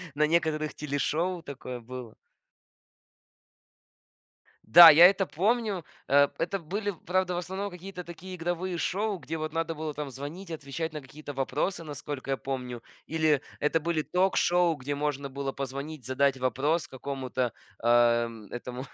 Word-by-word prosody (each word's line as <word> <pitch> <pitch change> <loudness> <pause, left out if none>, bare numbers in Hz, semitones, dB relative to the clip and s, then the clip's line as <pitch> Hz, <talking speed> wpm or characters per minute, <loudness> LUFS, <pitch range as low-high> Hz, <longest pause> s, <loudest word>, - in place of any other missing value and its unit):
на 150 +1 +3
некоторых 155 -1 +1
телешоу 160 +5 -1
такое 130 -3 -7
было. 120 -1 -9 2.5
Да, 170 0 +11
я 160 +3 +9
это 195 0 +1
помню. 205 0 0 0.2
Э, 145 +1 +6
это 185 +4 -1
были, 200 +5 -3
правда, 180 0 +1
в - - -2
основном 190 +3 -3
какие-то 180 0 -8
такие 175 +2 -9
игровые 175 +1 -2
шоу, 205 +4 -1
где 165 -2 -5
вот 155 0 -4
надо 165 0 -1
было 155 0 -4
там 145 -1 -5
звонить, 150 +8 -8
отвечать 160 +1 -4
на 150 - -5
какие-то 145 +2 -9
вопросы, 140 +7 -1
насколько 145 -3 -6
я 135 - +1
помню. 125 -3 -5 0.2
Или 155 -3 +2 0.2
это 150 +2 +2
были 165 0 0
ток-шоу, 180 -1 +2
где 145 0 -4
можно 140 -1 -2
было 135 0 -3
позвонить, 140 +1 -6
задать 135 +1 +2
вопрос 140 +6 0
какому-то, 130 -2 -3 0.3
э, - - +1 0.6
этому 125 +1 -6
155 Hz, 145 wpm, -28 LUFS, 140-175 Hz, 2.5 s, Да